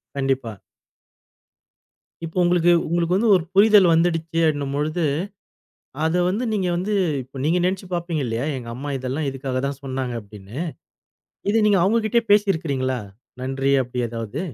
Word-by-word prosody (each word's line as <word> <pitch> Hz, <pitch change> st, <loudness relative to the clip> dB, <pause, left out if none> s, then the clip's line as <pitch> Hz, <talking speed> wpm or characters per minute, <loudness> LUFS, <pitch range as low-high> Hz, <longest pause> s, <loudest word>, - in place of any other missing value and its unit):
கண்டிப்பா. 135 Hz, -6 st, -1 dB, 1.7 s
இப்போ, 165 Hz, +2 st, -8 dB
உங்களுக்கு 175 Hz, 0 st, +3 dB, 0.2 s
உங்களுக்கு 170 Hz, +1 st, +1 dB
வந்து 220 Hz, +4 st, +2 dB
ஒரு 180 Hz, -, +1 dB
புரிதல் 205 Hz, -2 st, +6 dB
வந்துடுச்சு 165 Hz, -1 st, +1 dB
அப்படின்னும்போது, 150 Hz, +2 st, -1 dB, 1.0 s
அத 160 Hz, +2 st, +1 dB
வந்து 210 Hz, +7 st, -1 dB
நீங்க 195 Hz, -4 st, 0 dB
வந்து 190 Hz, +5 st, -1 dB, 0.3 s
இப்ப 130 Hz, +2 st, -11 dB
நீங்க 165 Hz, +4 st, +2 dB
நினைச்சுப் 185 Hz, 0 st, -2 dB
பாப்பீங்க 170 Hz, -3 st, -2 dB
இல்லையா? 115 Hz, +3 st, -2 dB
எங்க 120 Hz, -3 st, -7 dB
அம்மா 140 Hz, +4 st, -5 dB
இதெல்லாம் 130 Hz, +4 st, -3 dB
இதுக்காகத்தான் 135 Hz, +1 st, -3 dB
சொன்னாங்க 130 Hz, -2 st, -3 dB
அப்படின்னு. 105 Hz, +2 st, -12 dB, 0.9 s
இத 215 Hz, -, +1 dB
நீங்க 205 Hz, -2 st, +4 dB
அவங்ககிட்டயே 225 Hz, +4 st, +2 dB
பேசி 205 Hz, -1 st, +5 dB
இருக்கிறீங்களா? 130 Hz, -5 st, -2 dB, 0.4 s
நன்றி, 135 Hz, +1 st, 0 dB
அப்படி 125 Hz, 0 st, -7 dB
ஏதாவது? 115 Hz, +4 st, -5 dB
155 Hz, 130 wpm, -22 LUFS, 130-180 Hz, 1.7 s, புரிதல்